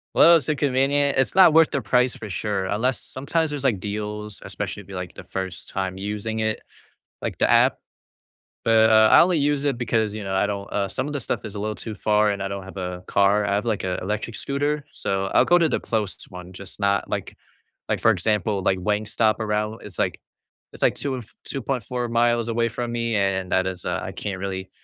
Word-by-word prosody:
Well, 170 0 +8
it's 160 - -4
inconvenient, 140 -1 +2
it's 130 - +1
not 185 -4 +8
worth 160 0 +6
their 140 - -2
price 125 0 +2
for 110 - -8
sure, 100 0 -2
unless 115 +7 0
sometimes 155 +4 -2
there's 145 -2 -4
like 120 -8 +2
deals, 105 +1 -5
especially - - -5
if - - -18
you're 100 - -7
like 90 -1 -6
the - - -10
first 95 0 -5
time 95 -1 -3
using 105 +2 -3
it, 110 0 -1 0.6
like - - -4
the - - +2
app - - +5 0.9
but, 110 0 +5
uh, 110 0 +7
I - - +9
only 175 -2 +3
use 145 0 +1
it 140 -3 +1
because, 110 -3 0
you 110 -1 -5
know, 95 -1 -2
I 95 - +3
don't 100 -1 -4
uh, 100 -1 0
some 130 +7 -3
of 150 - -5
the 145 - -2
stuff 120 - -3
is 105 -1 -7
a - - -4
little 105 +1 -2
too 110 0 -7
far 105 0 +2
and 100 -1 -2
I - - -1
don't 100 0 -5
have 95 +1 -11
a 90 -1 -5
car, 100 +1 +3
I 100 - +1
have 105 - -1
like 110 -4 -1
a 90 -1 -2
electric 105 +4 -3
scooter, 145 +1 -1
so, 95 0 -2
I'll - - +6
go 175 - +5
to 170 -2 +3
the - - 0
closest 105 -4 -3
one, 90 0 -10
just 95 +1 -9
not 100 -1 +1
like - - -4 0.5
like - - 0
for 110 - +5
example, 105 0 +1
like 95 - +2
Wingstop, 105 +3 +1
around 105 -1 -1
w 110 - -11
it's 95 -5 -10
like - - 0 0.5
it's - - -13
like - - +4
2 140 -2 -2
and 125 - -4
f 110 - -19
2.4 125 -2 -3
miles 120 0 +2
away 115 0 +1
from 120 +1 -4
me 115 -1 -1
and 95 -2 0
that 95 0 +2
is 90 -1 -6
uh, - - -1
I - - -5
can't 95 -2 -4
really 95 -1 -4
110 Hz, 230 wpm, -23 LUFS, 100-125 Hz, 0.9 s, I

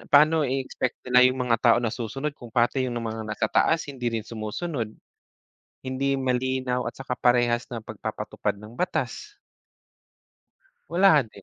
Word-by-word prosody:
paano 155 +1 +6
i-expect 135 -1 -2
nila 125 0 +5
yung 130 0 -2
mga 115 -2 +3
tao 115 - +5
na 120 -2 0
susunod 135 +5 -3
kung 120 -4 -12
pati 125 +2 +1
yung 120 - -4
mga 110 -1 -4
naka-taas 110 +9 +2
hindi 125 -2 -2
rin 115 -2 -3
sumusunod? 115 +4 -4 0.9
Hindi 135 +1 -1
yung 135 - -2
malinaw 125 0 0
at - - -4
saka 130 -2 -5
parehas 120 -1 +3
ng 115 - -5
pagpapatupad - - -4
ng 105 +4 -13
batas. - - -3 1.5
Wala 170 -3 +5
din. 100 -2 -16
125 Hz, 145 wpm, -26 LUFS, 115-135 Hz, 1.5 s, paano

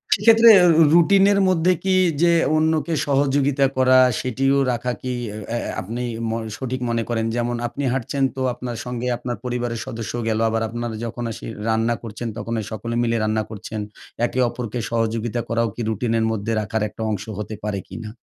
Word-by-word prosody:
সেক্ষেত্রে 225 +3 +6 0.3
রু 165 - +6
রুটিনের 195 +3 +5
মধ্যে 180 -1 +3
কি 190 -1 +2 0.3
যে 170 0 +5 0.2
অন্যকে 160 +1 +1
সহযোগিতা 140 0 +2
করা 130 0 +5 0.2
সেটিও 135 +2 +1
রাখা 125 +1 -2
কি 130 - -3 0.2
এ 105 - -7
অ্যা 120 - -1
অ্যা - - -4
আপনি 115 +6 -5 0.3
ম - - -1 0.3
সঠিক 130 -1 -4
মনে 115 -1 0
করেন? 115 -1 0
যেমন 120 0 -1
আপনি 140 +4 -5
হাঁটছেন 135 +2 -2
তো 130 - -4
আপনার 120 -1 -6
সঙ্গে 125 0 -4
আপনার 120 0 -4
পরিবারের 120 -2 -2
সদস্যও 115 +1 -5
গেলো। 110 0 0
আবার 115 0 -1
আপনার 120 0 -4
যখন 120 +1 -5
এসে - - -8 0.2
রান্না 115 +1 +1
করছেন 115 +1 -6
তখনে 115 +1 -3
সকলে 115 +2 -4
মিলে 115 -1 +1
রান্না 110 0 0
করছেন। 110 0 -6 0.5
একে 125 - -3
অপরকে 120 -1 -5
সহযোগিতা 115 0 -1
করাও 115 0 +1
কি 120 - -5
রুটিনের 115 +1 0
মধ্যে 110 +1 -2
রাখার 105 +2 -2
একটা 110 - -11
অংশ 100 - -3 0.2
হতে 105 +1 -5
পারে 105 -2 -2
কি - - -9
না? - - -5
120 Hz, 180 wpm, -22 LUFS, 115-135 Hz, 0.5 s, সেক্ষেত্রে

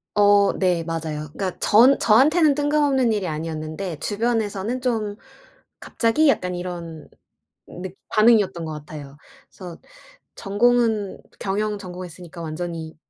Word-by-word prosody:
어 205 -1 +5
네. 180 -3 0
맞아요. 160 -2 -4
그러니까 185 0 -4
전 245 +6 +5
저한테는 295 +8 +4
뜬금없는 290 -4 +2
일이 205 -4 -1
아니었는데 155 +2 -5
주변에서는 220 +1 -1
좀 220 -5 -1 0.6
"갑자기?" 265 +7 +1
약간 180 -9 0
이런 170 -3 -7 0.6
늑 185 +1 -8
반응이었던 215 -6 +3
것 155 - -5
같아요. 145 -2 -10 0.3
그래서 180 -3 -10 0.6
전공은 220 0 +1 0.2
경영 210 +2 -2
전공했으니까 180 -2 -9
완전히 160 0 -5
195 Hz, 300 characters per minute, -22 LUFS, 165-225 Hz, 0.6 s, 어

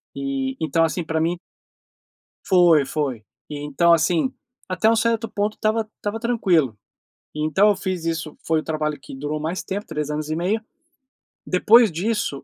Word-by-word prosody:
E, 135 -1 -3
então 160 +1 +2
assim, 165 +2 -1
pra 160 0 -1
mim 170 +2 0 1.1
Foi, 175 -5 +5
foi. 135 -6 -3 0.2
E, 150 - -6
então, 150 +4 +3
assim, 170 - +2 0.4
até 185 +4 +1
um 230 - +3
certo 230 0 +1
ponto 210 0 -1
estava 220 0 0
estava 205 +2 -4
tranquilo, 180 - +1 0.6
então 155 +7 +3
eu 205 - +3
fiz 185 -3 -4
isso 165 -2 -3
foi 160 -1 +2
o - - -6
trabalho 155 -2 -2
que - - -10
durou 145 +3 -3
mais 160 +4 -3
tempo, 200 +2 -4
3 150 -1 -4
anos 150 0 -3
e 155 - -1
meio, 190 +6 0 0.8
depois 220 +4 +5
disso, 180 -4 -2
165 Hz, 165 wpm, -22 LUFS, 150-205 Hz, 1.1 s, Foi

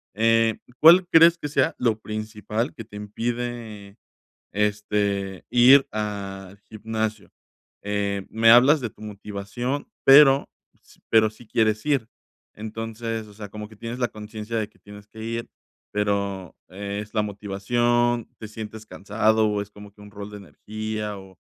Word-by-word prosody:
Eh, 115 0 +3 0.2
¿cuál 175 +3 +8
crees 165 0 +6
que 150 - -5
sea 135 -2 +1
lo 115 -3 0
principal 110 +3 -4
que 115 -6 -8
te 105 -1 -15
impide, 110 -1 -5 0.6
este, 100 -2 -1
ir 130 +3 +7
al 100 -2 -5
gimnasio? 110 0 -4 0.5
Eh, 100 -1 -2
me 115 +1 +3
hablas 135 +6 +7
de 120 - -3
tu - - -21
motivación, 105 +6 -5 0.2
pero 135 0 +7 0.3
s - - -24
pero 110 -1 +5
sí 110 +2 -17
quieres 110 +1 +1
ir. 135 -7 +1 0.5
Entonces, 110 +1 -5
o 105 - -15
sea, 105 -1 -9
como 105 0 -8
que 110 - -15
tienes 115 +3 -6
la 120 - +1
conciencia 105 +1 -7
de 110 -2 -2
que - - -29
tienes 105 0 -13
que 110 0 -12
ir, 115 0 -4 0.4
pero, 100 -3 -2
¿es 100 +3 -6
la 105 - +2
motivación, 120 +4 0
te 110 - -7
sientes 110 0 -8
cansado, 110 0 +1
es 105 0 -9
como 105 0 -13
que 105 - -25
un 105 - -12
rol 100 0 -8
de 105 - -8
energía 105 +4 -6
o 95 -1 -15
110 Hz, 150 wpm, -24 LUFS, 105-115 Hz, 0.6 s, cuál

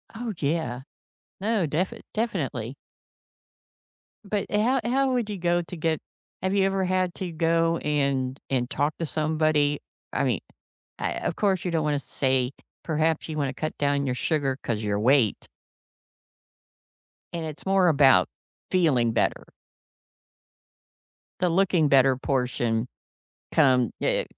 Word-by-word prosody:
Oh, 230 -1 -4
yeah. 140 -5 -1 0.6
No, 210 -1 +1
def 165 +6 -1 0.2
definitely. 140 - -2 1.5
But 200 0 -1
ho 235 +6 +2
how 265 +2 +2
would 240 -4 0
you 205 - -3
go 175 0 +1
to 175 - -8
get 160 -1 0 0.4
have 190 +1 0
you 200 -1 +3
ever 195 -1 +1
had 185 -1 0
to 185 -2 -4
go 165 0 +2
and 140 -3 -1
and 125 -2 0
talk 145 +2 0
to 165 - -1
somebody? 155 -1 +1 0.3
I - - +1
mean, - - +1 0.6
uh, - - -2
of - - -2
course 195 -3 +1
you 180 - -1
don't 160 -2 0
wanna 145 -1 +1
say, 130 -1 0 0.3
"Perhaps 160 0 0
you 155 - -4
wanna 135 -3 -1
cut 155 +3 -4
down 140 -1 +1
your 125 - 0
sugar 135 -1 0
'cause 110 -2 -2
your 105 -1 -1
weight." 125 -2 +2 1.9
And 170 -1 -3
it's 155 -2 -7
more 190 -1 +4
about 135 - +5 0.4
feeling 135 -11 +3
better. - - 0 2.0
The 180 0 +2
looking-better 150 -8 +4
portion 125 -3 -1 0.7
come 125 -3 +4
Yeah - - +1
155 Hz, 135 wpm, -26 LUFS, 135-180 Hz, 2.0 s, about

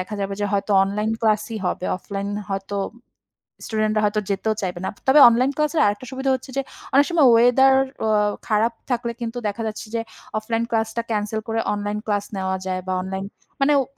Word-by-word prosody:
দেখা 185 +4 -5
যাবে 195 0 -2
যে, 205 - +1
হয়তো 200 +1 -1
অনলাইন 210 +2 -1
ক্লাসই 220 0 +1
হবে। 180 - -2
অফলাইন 200 +1 -5 0.2
হয়তো 195 +1 -3 0.9
স্টুডেন্ট 215 -1 0
রা - - +3
হয়তো 210 +1 +1
যেতেও 210 +2 0
চাইবে 180 -2 -3
না। - - -1
ত - - -29
তবে 285 +3 +7
অনলাইন 250 +4 +2
ক্লাসের 300 +1 +1
আরেকটা 205 +4 0
সুবিধা 265 +1 -2
হচ্ছে 260 +1 -9
যে, - - +3 0.3
অনেক 280 +2 +6
সময় 320 -6 +5
ওয়েদার 250 +3 +6 0.3
অ 220 - +1 0.4
খারাপ 220 +2 +2 0.2
থাকলে 235 -1 -1
কিন্তু 235 +1 -4
দেখা 210 +3 -3
যাচ্ছে 215 0 -6
যে, 230 - +1 0.4
অফলাইন 225 +1 -1
ক্লাসটা 225 +1 0
ক্যানসেল 210 +1 -1
করে 225 0 -1
অনলাইন 205 0 -2
ক্লাস 205 -1 0
নেওয়া 190 0 -1
যায়। 185 -1 -2
বা 185 - 0
অনলাইন 190 +1 -4 0.4
মানে 290 +2 +4
ও - - 0
215 Hz, 195 wpm, -22 LUFS, 200-235 Hz, 0.9 s, তবে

